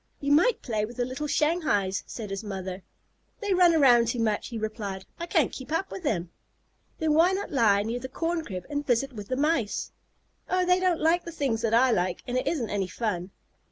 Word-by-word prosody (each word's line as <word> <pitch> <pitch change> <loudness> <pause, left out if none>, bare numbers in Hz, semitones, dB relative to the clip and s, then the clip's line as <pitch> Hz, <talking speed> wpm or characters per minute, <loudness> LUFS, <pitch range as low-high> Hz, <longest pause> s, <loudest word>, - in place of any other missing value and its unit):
"You 280 0 -1
might 355 +12 +4
play 215 -4 -1
with 235 +4 -6
the 245 - 0
little 265 +4 -4
Shanghais," 295 - +1
said 215 -4 -7
his 195 +2 -4
mother. 190 -2 -5 0.6
"They 415 -3 0
run 355 -2 +5
around 245 -6 +5
too 235 - -1
much," 215 -2 0
he 235 - -6
replied. 210 -3 -4
"I 340 - -4
can't 325 -4 +2
keep 260 +2 -9
up 330 +4 -1
with 385 - -6
them." 180 - -1 0.7
"Then 315 -1 +1
why 335 +4 +5
not 395 +1 -3
lie 210 -7 +3
near 230 +3 -3
the 260 +1 -7
corn 330 +4 -2
crib 185 - -6
and 290 0 -2
visit 265 +1 0
with 205 -3 -8
the 255 - -2
Mice?" 280 -8 0 0.6
"Oh, 365 0 +2
they 360 0 +4
don't 365 -3 +1
like 330 +3 +2
the 335 - -7
things 270 -8 -1
that 225 0 +2
I 255 +2 +5
like, 180 -4 0
and 245 - -4
it 255 - 0
isn't 255 -10 -1
any 195 -2 -1
fun." 185 -3 -3
250 Hz, 220 wpm, -27 LUFS, 210-320 Hz, 0.7 s, run